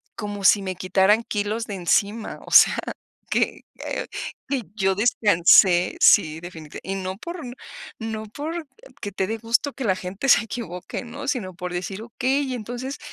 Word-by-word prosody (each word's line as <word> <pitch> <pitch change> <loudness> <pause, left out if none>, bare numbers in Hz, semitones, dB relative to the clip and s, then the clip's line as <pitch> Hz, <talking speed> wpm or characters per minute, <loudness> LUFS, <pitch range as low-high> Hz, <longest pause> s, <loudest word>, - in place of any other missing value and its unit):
como 205 -1 -5
si 200 +1 +5
me 185 -1 -3
quitaran 190 +4 +3
kilos 210 +2 -2
de 205 - -5
encima, 200 +5 0
o - - -11
sea, - - +8 0.5
que, - - 0 0.2
eh, - - -3 0.4
que 270 -4 -1
yo 195 -2 +1
descansé. 185 -4 +5
Sí, 160 -5 +5
definiti 160 -3 -9
y 195 - -3
no 190 0 -4
por 345 - -7
n 245 - -7 0.5
no 220 -1 -4
porque 315 - -7
te 190 - 0
dé 225 +2 -2
gusto 235 +5 0
que 270 - -6
la 190 - +2
gente 185 +8 -5
se 235 - +6
equivoque, 210 -6 -6
¿no? 235 - -8
Sino 220 -10 -2
por 180 0 -5
decir 190 +3 -4
okey, 260 +3 -1
entonces, 245 +4 -5
210 Hz, 165 wpm, -23 LUFS, 185-240 Hz, 0.5 s, sea